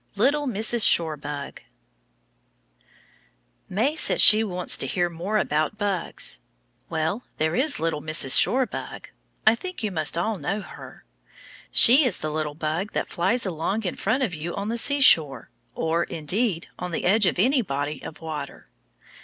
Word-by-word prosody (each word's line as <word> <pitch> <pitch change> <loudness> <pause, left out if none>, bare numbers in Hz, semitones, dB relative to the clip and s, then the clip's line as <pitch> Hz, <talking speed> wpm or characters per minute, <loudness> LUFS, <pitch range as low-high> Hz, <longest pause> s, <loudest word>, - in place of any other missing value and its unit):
LITTLE 285 +7 +1
MRS. 225 0 +1
SHORE 160 -2 +3
BUG 145 -1 -8 2.1
May 235 +11 0
says - - +2
she 215 +1 +7
wants 180 -4 +1
to - - -2
hear 175 -2 -1
more 180 +6 -3
about 155 +1 -1
bugs. 200 -5 -2 0.5
Well, 160 +8 -3
there 155 +1 -1
is 285 +3 +1
little 160 -2 -2
Mrs. 155 -4 +3
Shore 260 +1 +3
Bug. - - -8 0.4
I 220 - +6
think 365 +3 -7
you 210 - -2
must 155 -2 -1
all 205 +3 -2
know 195 +8 -3
her. 175 - -13 0.7
She 260 +6 +8
is 245 -8 -1
the 155 - -5
little 150 -1 -4
bug 160 +6 -4
that - - -3
flies 230 +7 0
along 190 +5 -3
in 180 - -3
front 265 +1 -1
of 210 -8 -2
you 165 +2 -6
on 200 +1 -4
the 235 - -2
seashore, 195 - +3 0.2
or, 165 +1 -1
indeed, 170 +3 -2
on 180 - -5
the 165 - -4
edge 205 +2 +3
of - - -1
any 255 +8 +2
body 145 - -4
of 155 - -10
water. 160 -2 -8
180 Hz, 160 wpm, -24 LUFS, 155-225 Hz, 2.1 s, She